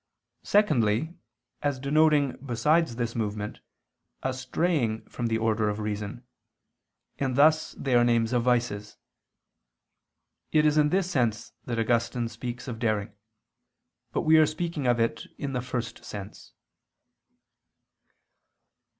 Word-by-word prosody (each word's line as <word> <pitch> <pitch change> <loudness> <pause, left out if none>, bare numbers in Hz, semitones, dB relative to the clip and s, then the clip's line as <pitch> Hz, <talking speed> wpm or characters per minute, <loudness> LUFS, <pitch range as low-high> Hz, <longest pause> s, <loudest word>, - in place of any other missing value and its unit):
Secondly, 150 - +2 0.5
as 145 -2 0
denoting 145 0 +3
besides 140 +3 +1
this 115 -1 -3
movement, 105 -2 -3 0.6
a 130 - 0
straying 130 -3 -1
from 120 - -3
the 110 -1 +1
order 110 -1 +1
of 105 - -2
reason: 105 +2 -4 0.9
and 130 -2 0
thus 155 +3 +4
they 135 - -2
are 120 0 +6
names 115 0 +2
of 120 - +3
vices. 115 -4 0 1.5
It 155 -1 +4
is 150 -1 +4
in 150 -1 +4
this 185 +2 0
sense 115 -8 0
that 120 -2 -3
Augustine 115 +1 0
speaks 120 +2 -6
of 115 -3 -5
daring: 110 -3 -1 1.0
but - - 0
we 160 +1 +5
are 155 - +6
speaking 155 -3 -3
of 120 -1 +3
it 115 0 -1
in 140 -2 -4
the 125 - -1
first 125 -2 -5
sense. 100 0 -9
120 Hz, 125 wpm, -27 LUFS, 115-145 Hz, 1.5 s, are